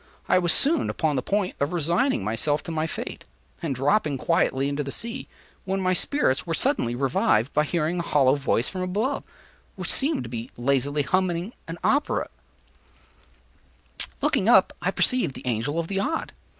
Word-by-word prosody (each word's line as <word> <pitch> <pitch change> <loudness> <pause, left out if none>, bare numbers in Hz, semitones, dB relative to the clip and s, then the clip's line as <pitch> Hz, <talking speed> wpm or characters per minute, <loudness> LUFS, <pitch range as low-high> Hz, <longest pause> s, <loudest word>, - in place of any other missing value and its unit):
I 185 - +4
was 175 -2 +2
soon 300 - +3
upon 155 -3 0
the 130 - 0
point 200 +5 -1
of 140 +4 -1
resigning 170 - +1
myself 115 +8 0
to - - -6
my 160 0 -1
fate, - - -6 0.4
and 150 -5 -2
dropping 145 - +1
quietly 130 +1 +1
into 140 +1 -2
the 135 - -6
sea, 235 - -4 0.4
when 195 +1 -2
my 185 -1 +1
spirits 175 - +1
were 165 - 0
suddenly 185 - 0
revived 130 -2 +1
by 150 +1 +2
hearing 170 +2 -1
a - - +1
hollow 135 -5 +3
voice 135 -4 0
from 185 - -4
above, 210 +10 -1 0.5
which - - 0
seemed 275 - +1
to - - -7
be 115 +1 -5
lazily 140 +3 +1
humming 185 - 0
an 165 +1 -6
opera 290 +1 +2
air. - - -11 0.2
Looking - - +2
up, - - +6
I - - +1
perceived 255 - +1
the - - -9
Angel 125 +5 -1
of 165 -1 -1
the 195 +1 -1
Odd. 315 +11 -2
160 Hz, 175 wpm, -25 LUFS, 135-195 Hz, 0.5 s, up